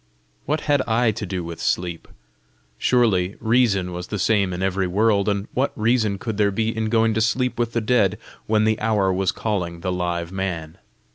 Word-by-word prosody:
What 150 +2 0
had 145 -2 +2
I 115 0 +2
to 105 -1 -5
do 90 -1 -3
with 85 0 -7
sleep? 85 -2 -2 0.7
Surely 100 -7 +2
reason 110 -6 +2
was 90 0 -6
the 105 - -3
same 100 -2 +2
in 90 +1 -3
every 95 0 0
world, 100 +2 +2
and 100 +1 -1
what 130 +3 0
reason 110 -2 +2
could 110 +1 -4
there 105 -1 +3
be 110 +3 -1
in 110 0 -1
going 115 0 +3
to 110 - 0
sleep 125 +2 0
with 120 -1 -1
the 115 - 0
dead, 105 -3 +2 0.3
when 110 0 +2
the 110 0 +1
hour 105 -4 +1
was 95 0 +1
calling 90 -6 -3
the 90 0 -2
live 85 -1 -2
man? 85 -5 -4
105 Hz, 195 wpm, -22 LUFS, 90-115 Hz, 0.7 s, there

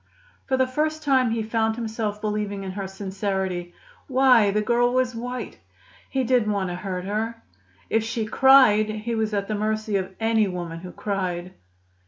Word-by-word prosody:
For 265 - +1
the 260 - +3
first 310 +4 -1
time, 260 -4 +3
he 225 0 -1
found 220 0 0
himself 220 -2 -3
believing 210 -2 -2
in 190 - -4
her 195 0 -4
sincerity. 190 -2 -3 0.3
Why, 255 -5 +5
the 205 +1 +1
girl 240 +3 +2
was 255 -1 +1
white. 245 +2 -6 0.5
He 265 -1 0
didn't 245 -4 +2
want 195 -3 -1
to - - -4
hurt 185 0 -4
her. 225 +3 -3 0.4
If 225 0 +1
she 225 0 -2
cried 235 -3 +6
he 215 +2 -3
was 220 -1 0
at 200 -1 -1
the 215 - -2
mercy 215 0 -1
of 190 0 -4
any 225 -1 +2
woman 175 -3 -5
who 180 +1 -9
cried. 185 -3 -3
215 Hz, 175 wpm, -24 LUFS, 195-235 Hz, 0.5 s, cried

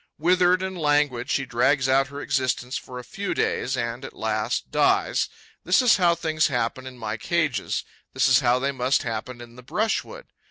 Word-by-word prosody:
Withered 180 +3 +3
and 190 0 -4
languid, 145 -5 +1
she 135 - 0
drags 130 +2 +2
out 135 +1 +3
her 140 +1 -8
existence 130 -2 -1
for 125 - -6
a 125 - -7
few 195 +11 -4
days 130 +1 -1
and, 120 +2 -3
at - - -9
last, 110 +1 -2
dies. - - +2 0.3
This 180 +3 +3
is 250 -3 +5
how 175 -3 +3
things 160 -2 +1
happen 125 0 -2
in 130 -1 -10
my 110 -1 -4
cages; 155 - -1 0.3
this - - +3
is - - +5
how 120 +1 +3
they 135 +2 -1
must 130 0 0
happen 120 +1 -5
in 120 0 -13
the - - -10
brushwood. 225 - -2
130 Hz, 190 wpm, -24 LUFS, 120-160 Hz, 0.3 s, is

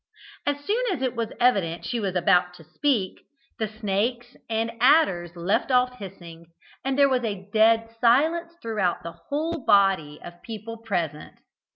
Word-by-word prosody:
As 285 0 0
soon 450 +5 0
as 275 -8 -3
it 255 -1 -1
was 230 -1 -3
evident 195 -9 +1
she 240 - -2
was 195 -4 -2
about 180 0 +3
to 160 - -14
speak, 195 - -1 0.4
the 220 - 0
snakes 220 +3 -2
and 225 0 -1
adders 235 - +3
left 175 +9 0
off 250 -1 +2
hissing, 170 -4 -10 0.4
and 270 0 -1
there 280 -1 +6
was 255 -2 0
a 200 -4 -4
dead 225 +1 +3
silence 320 +8 +3
throughout 210 -6 -1
the 170 - -6 0.2
whole 315 +1 -2
body 190 -9 +3
of 175 0 -11
people 230 0 -7
present. 175 -9 -4
225 Hz, 160 wpm, -25 LUFS, 180-250 Hz, 0.4 s, there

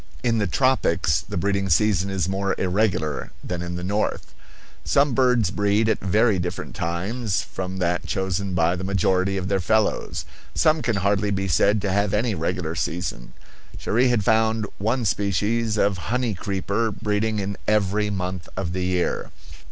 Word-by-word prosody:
In 115 -2 +2
the 105 - +1
tropics 85 - +2
the 80 - -6
breeding 100 +1 0
season 100 +1 +3
is 95 -3 -1
more 95 +1 -1
irregular 90 -6 0
than 90 -1 -4
in 85 0 -4
the 90 - -5
north. 100 +3 -2 0.5
Some 140 -1 +3
birds 125 -7 +3
breed 105 +2 +2
at 110 - +1
very 105 +1 +2
different 90 +1 -4
times 95 +3 -2
from 95 +3 -5
that 90 -1 -1
chosen 95 0 -2
by 85 +1 +2
the 90 - -5
majority 95 0 +1
of 95 0 -3
their 100 0 +1
fellows; 110 +4 0 0.3
some 155 0 +3
can 115 -5 0
hardly 100 +1 +1
be 95 -1 -1
said 100 +3 +3
to 100 - 0
have 100 +1 +1
any 110 +1 +1
regular 85 -1 -2
season; 85 -7 -3 0.4
Cherrie 120 +4 +2
had 120 -5 +1
found 110 0 +2
one 115 +4 0
species 105 +3 0
of 100 -2 +2
honey 125 -1 0
creeper 100 +3 -1
breeding 105 +1 -1
in 100 0 -2
every 105 0 +2
month 90 -3 -4
of 90 -3 -2
the 95 0 -2
year. 90 -1 -1
100 Hz, 165 wpm, -23 LUFS, 90-110 Hz, 0.5 s, season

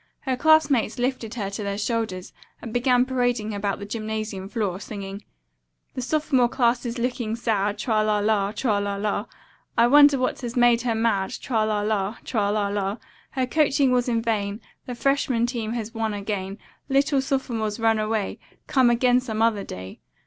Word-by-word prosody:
Her 260 -2 -1
classmates 285 -5 +3
lifted 245 -2 -2
her 200 -4 -3
to 200 - -5
their 200 -1 -3
shoulders 215 -4 -2 0.3
and 230 - -8
began 250 0 +3
parading 245 -4 0
about 200 -1 -2
the 200 - -7
gymnasium 215 -2 -4
floor, 200 -5 -2
singing: 200 -1 -7 0.7
"Nineteen 255 -3 +1
is 240 +1 -3
looking 235 -2 -2
sad, 210 -3 0
Tra 215 0 +1
la 215 -1 +2
la, 205 -1 +1
Tra 215 -2 0
la 200 0 -2
la, 205 +2 -2 0.5
I 235 - +6
wonder 285 +2 +7
what 255 +1 -1
has 240 -2 -5
made 240 -1 +4
her 235 -2 0
mad, 220 -4 0
Tra 225 -4 0
la 210 -1 0
la, 210 0 -1
Tra 205 -5 0
la 205 -1 0
la, 200 +1 -2 0.4
Her 260 -1 0
coaching 275 0 +2
was 250 0 +2
in 230 -1 0
vain, 210 -2 -1 0.3
The 250 - -4
freshman 255 -1 +1
team 235 -2 -3
has 230 -1 -4
won 220 -2 -2
again, 200 -1 -4 0.3
Little 275 0 +2
sophomores, 235 -6 -2
run 225 -1 +3
away, 215 -1 -2 0.3
Come 260 -5 +3
again 245 +1 +3
some 225 -4 -4
other 220 -3 +2
day." 95 - -8
225 Hz, 170 wpm, -24 LUFS, 205-250 Hz, 0.7 s, wonder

